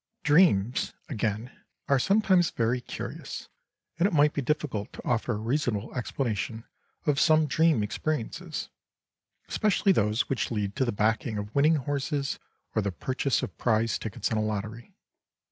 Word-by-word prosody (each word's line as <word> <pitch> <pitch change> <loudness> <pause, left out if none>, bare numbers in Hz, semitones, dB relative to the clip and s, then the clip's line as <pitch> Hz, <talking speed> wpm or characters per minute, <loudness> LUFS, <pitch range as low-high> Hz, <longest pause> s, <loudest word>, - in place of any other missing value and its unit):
Dreams, 145 - +3 0.2
again, 110 -1 -2 0.4
are 140 -1 +4
sometimes 195 - +3
very 120 +2 0
curious, - - -7 0.5
and 180 - +5
it 205 - -3
might 150 -1 +4
be 145 - -1
difficult 130 -6 -2
to - - -10
offer 120 0 +1
a - - -2
reasonable 115 -2 -1
explanation 115 -3 -2 0.4
of 145 -2 +2
some 155 0 +5
dream 155 -4 +3
experiences, 125 +4 -3 0.8
especially 205 -1 +2
those 110 - +2
which 135 - -1
lead 105 -3 -2
to 135 - +2
the 120 - 0
backing 110 +1 0
of 105 +1 -5
winning 150 +3 +4
horses 140 0 -2 0.3
or - - +2
the 100 -1 -1
purchase 130 +8 -1
of - - -5
prize 115 -1 +1
tickets 110 +1 -3
in 110 - +1
a - - +1
lottery. 110 +2 -4
125 Hz, 150 wpm, -28 LUFS, 110-150 Hz, 0.8 s, and